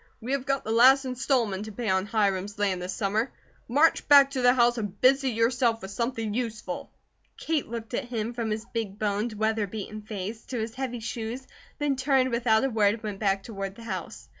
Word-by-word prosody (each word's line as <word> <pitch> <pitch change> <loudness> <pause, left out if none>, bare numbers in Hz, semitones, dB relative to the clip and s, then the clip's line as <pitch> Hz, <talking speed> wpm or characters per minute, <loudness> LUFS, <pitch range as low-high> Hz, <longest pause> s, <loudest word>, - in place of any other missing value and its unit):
We 240 +4 -5
have 275 0 -1
got 275 -1 0
the 220 - -3
last 260 +4 +6
installment 240 -5 0
to 215 - -7
pay 230 +2 -5
on 190 0 +1
Hiram's 205 -2 0
land 195 -3 0
this 180 +1 -4
summer. 215 +5 -1 0.4
March 290 +7 +3
back 280 -2 +7
to 265 -2 -2
the 245 +1 +5
house 240 -1 +3
and 205 -2 -5
busy 270 +1 +4
yourself 230 -1 +1
with 190 - -6
something 230 -1 -2
useful!" 225 -2 -4 0.5
Kate 315 -3 -1
looked 230 0 -7
at - - -1
him, 235 -1 -3
from 230 -2 -3
his 215 +1 -3
big 215 -4 -3
boned, 210 +2 -1
weather 220 0 0
beaten 215 +1 -6
face, 210 +1 -6
to 255 - -5
his 220 +1 -3
heavy 250 -2 -4
shoes, 230 +3 -5 0.3
then 290 -3 0
turned 265 -1 +2
without 235 -1 +2
a 270 - +2
word 210 -2 +3
and 225 - -14
went 205 -2 -5
back 195 -2 +1
toward 195 -3 -6
the 230 - -12
house. 190 -6 -6
225 Hz, 210 wpm, -27 LUFS, 210-250 Hz, 0.5 s, back